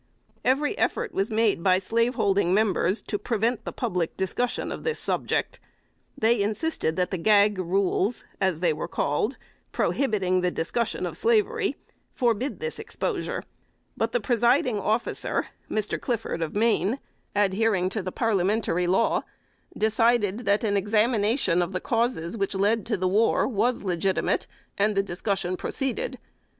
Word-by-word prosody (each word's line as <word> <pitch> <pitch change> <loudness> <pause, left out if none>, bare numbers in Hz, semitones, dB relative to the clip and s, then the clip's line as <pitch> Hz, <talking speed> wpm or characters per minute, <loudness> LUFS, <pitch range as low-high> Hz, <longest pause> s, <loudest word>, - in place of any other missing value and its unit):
Every 280 +8 +2
effort - - 0
was 195 +4 0
made 220 -5 +2
by 185 0 +4
slaveholding 200 -3 +1
members 200 -2 +1
to 205 - -3
prevent 230 +2 -1
the - - -3
public 175 -2 -2
discussion 215 +6 -1
of - - -6
this 465 -1 -1
subject. - - -1 0.6
They 225 0 +3
insisted 210 - -1
that 180 +1 0
the 185 - -2
gag 205 +1 +4
rules, 190 +4 0 0.2
as 185 -4 +1
they 170 -3 +3
were 150 - -4
called, 210 - -1 0.3
prohibiting 195 -8 +1
the 180 - +2
discussion 205 +8 -2
of - - -5
slavery, 450 -2 +1 0.4
forbid 245 +2 0
this 475 0 -4
exposure; - - -3 0.5
but - - -1
the - - +1
presiding 245 - +2
officer 220 +4 -1 0.2
(Mr. 215 -1 -1
Clifford 230 -8 -2
of 165 +2 -3
Maine) 225 +1 +2 0.4
adhering 200 -1 +2
to 215 +2 -3
the 185 0 -4
parliamentary 200 -4 +1
law, 190 +6 +2 0.6
decided 220 0 +2
that 200 +2 +3
an 205 -2 +1
examination 210 -1 +2
of 175 +2 -2
the 185 - -1
causes 230 -7 -1
which 195 -2 -2
led 205 +3 +1
to 220 -3 0
the 185 0 0
war 210 +5 +3
was 240 0 0
legitimate, 185 0 0 0.3
and 210 +1 +2
the 195 - +2
discussion 185 -1 -2
proceeded. 270 - -3
210 Hz, 145 wpm, -26 LUFS, 185-235 Hz, 0.6 s, by